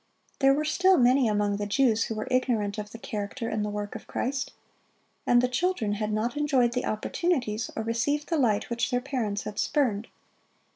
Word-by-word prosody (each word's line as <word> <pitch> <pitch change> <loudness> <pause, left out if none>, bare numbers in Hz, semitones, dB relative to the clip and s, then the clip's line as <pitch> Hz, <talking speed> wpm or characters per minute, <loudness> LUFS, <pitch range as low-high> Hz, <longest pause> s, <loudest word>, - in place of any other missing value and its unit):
There 270 0 +5
were 305 +2 -1
still 365 +4 +4
many 250 0 +4
among 205 -1 +1
the 205 0 -3
Jews 225 0 +2
who 225 - -4
were 215 - -4
ignorant 225 -5 +1
of 210 0 -6
the 230 - -8
character 220 +2 -4
and 220 -1 -1
the 210 - -2
work 205 0 -4
of - - -9
Christ. 265 +2 -2 0.8
And 245 0 +5
the - - +4
children 250 - 0
had 210 +1 -2
not 220 +5 -1
enjoyed 270 -5 +2
the 250 - -1
opportunities 230 -1 -1
or 220 - -2
received 235 +7 -1
the 330 -3 +1
light 225 -3 +1
which 235 0 0
their 245 -2 +1
parents 245 -6 -2
had 210 0 -6
spurned. 230 -7 +1
235 Hz, 195 wpm, -27 LUFS, 210-270 Hz, 0.8 s, There